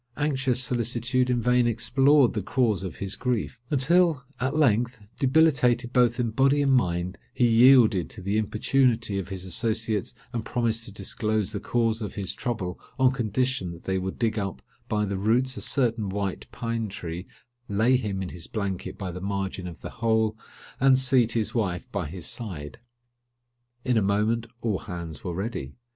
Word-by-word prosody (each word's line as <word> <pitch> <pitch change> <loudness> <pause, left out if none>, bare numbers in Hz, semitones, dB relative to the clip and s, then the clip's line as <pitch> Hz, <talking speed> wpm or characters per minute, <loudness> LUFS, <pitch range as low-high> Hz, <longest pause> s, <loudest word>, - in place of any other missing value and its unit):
Anxious 135 -4 0
solicitude 125 +1 0
in 120 -2 +1
vain 125 -1 +3
explored 125 +4 +3
the 105 - -1
cause 110 -1 +1
of 95 -3 -5
his 100 0 -4
grief; 125 -1 -2
until, 155 +1 +3 0.2
at 130 +3 -1
length, 120 -4 +2 0.2
debilitated 135 -4 +3
both 120 -1 +3
in 120 -2 0
body 135 +5 +3
and 135 -1 +3
mind, 90 -6 0 0.2
he 125 - +3
yielded 115 -6 +6
to - - -8
the 100 +2 -1
importunity 110 0 +2
of 95 - -6
his 95 -2 -5
associates, 110 +2 -1 0.2
and 115 -2 -2
promised 115 -1 -1
to - - -9
disclose 105 +1 -1
the 105 - -3
cause 115 +1 0
of 105 - -5
his 95 -2 -2
trouble 105 -8 -3 0.2
on 130 -1 +4
condition 125 -4 -1
that 85 - -13
they 95 0 -1
would 95 +1 -4
dig 115 -2 0
up 95 -11 -4 0.3
by 105 -1 +1
the 100 -1 -3
roots 120 +6 +2
a - - -5
certain 115 -6 +1
white 100 -1 -3
pine 115 -1 -3
tree, 90 -1 -6 0.4
lay 110 +6 +3
him 100 -6 -2
in 90 - -5
his 85 -1 -8
blanket 100 -4 -4
by 95 -3 -4
the 90 +1 -7
margin 95 -1 -3
of 85 -2 -9
the - - -7
hole, 110 -1 +2 0.4
and 135 0 +5
seat 130 -3 +3
his 115 0 -1
wife 105 -2 -1
by 95 -6 -2
his 90 +2 -5
side. 85 - -5 1.1
In 125 -2 +2
a - - +4
moment 105 +4 +1
all 110 -5 0
hands 85 -3 -7
were 90 -3 -4
ready. 95 - -4
115 Hz, 175 wpm, -26 LUFS, 95-125 Hz, 1.1 s, yielded